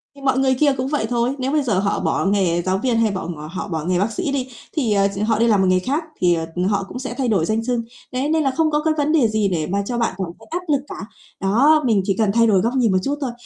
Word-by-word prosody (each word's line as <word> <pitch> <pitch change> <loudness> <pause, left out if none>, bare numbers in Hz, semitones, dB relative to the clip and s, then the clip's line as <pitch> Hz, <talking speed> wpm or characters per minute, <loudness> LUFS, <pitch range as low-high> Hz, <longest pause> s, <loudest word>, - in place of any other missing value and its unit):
thì 280 - -14
mọi 265 -1 +1
người 265 -1 +3
kia 290 -2 +4
cũng 260 +1 -2
vậy 290 -6 -1
thôi, 245 +2 0
nếu 260 +2 -1
bây 300 -2 +1
giờ 210 -7 +1
họ 200 0 0
bỏ - - 0
nghề 185 -4 +1
giáo 185 +2 0
viên 235 +1 0
hay 225 -2 +2
bọ 185 -3 -4
ngọ 155 -3 -6
họ 185 - -4
bỏ 160 -4 -3
nghề 180 0 +1
bác 215 +3 0
sĩ 275 +6 -2
đi 265 -2 -2 0.3
thì, 245 -9 0
ờ, 200 0 +3
ch - - -5
họ 220 -1 +1
đi 235 - +3
làm 205 -4 +3
một 190 - +2
nghề 185 0 +3
khác 285 - -2 0.2
thì, 175 -1 +4
ờ, 165 -1 -1
ừm, 180 +1 0
họ 200 0 +1
cũng 250 - -7
sẽ 260 -1 -5
thay 260 -2 0
đổi 190 -7 +2
danh 220 +3 -1
xưng, 240 -1 -1 0.3
đấy, 265 +4 -1
nên 320 -1 +2
là 270 - +1
không 315 +2 +1
có 300 +1 0
cái 315 -1 +2
vấn 295 +1 +1
đề 285 -8 +4
gì 215 -2 0
để 160 -4 -1
mà 200 +2 -1
cho 240 +1 -3
bạn 230 -4 0
cảm 190 -3 -3
thấy - - -17
áp 350 +1 -2
lực 275 - +1
cả. 190 - -7 0.3
Đó, 270 +11 +4
mình 215 -5 +3
chỉ 195 -2 0
cần 215 -3 +2
thay 230 0 +4
đổi 195 -4 +3
góc 235 +3 0
nhìn 240 -6 +3
một 185 - +3
chút 285 +1 -1
thôi, 255 -3 -2
230 Hz, 320 wpm, -20 LUFS, 195-270 Hz, 0.3 s, kia